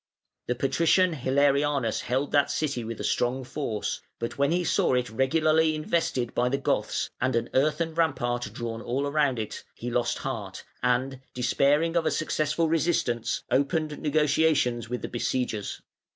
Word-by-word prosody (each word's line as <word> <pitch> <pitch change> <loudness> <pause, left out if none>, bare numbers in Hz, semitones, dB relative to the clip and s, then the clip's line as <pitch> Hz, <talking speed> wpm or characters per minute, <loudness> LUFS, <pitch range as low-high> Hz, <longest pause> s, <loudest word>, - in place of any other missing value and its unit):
The 125 - 0
Patrician 165 +7 +3
Hilarianus 140 -2 +1
held 130 +3 -1
that 145 -1 +3
city 140 -6 -1
with 115 0 -6
a - - -4
strong 125 +2 0
force, 125 -5 -3 0.2
but 115 - -4
when 140 +2 +2
he 175 +1 +1
saw 140 - +2
it 125 -2 -1
regularly 155 +5 +2
invested 155 -6 -1
by 125 +1 +1
the 140 - 0
Goths - - -1
and 130 0 +1
an 115 0 -1
earthen 155 +4 +1
rampart 130 -7 0
drawn 115 -1 -5
all 130 +4 -1
round 145 -4 +2
it, 110 -1 -5
he 120 +1 -5
lost 120 0 0
heart, 105 -8 -5 0.2
and, 125 +2 0
despairing 145 +6 +2
of 165 -2 +2
a - - +4
successful 155 +1 0
resistance, 155 -8 0
opened 150 +2 0
negotiations 150 -5 +2
with 125 0 -4
the - - -2
besiegers. 120 -4 -2
135 Hz, 155 wpm, -27 LUFS, 120-155 Hz, 0.2 s, a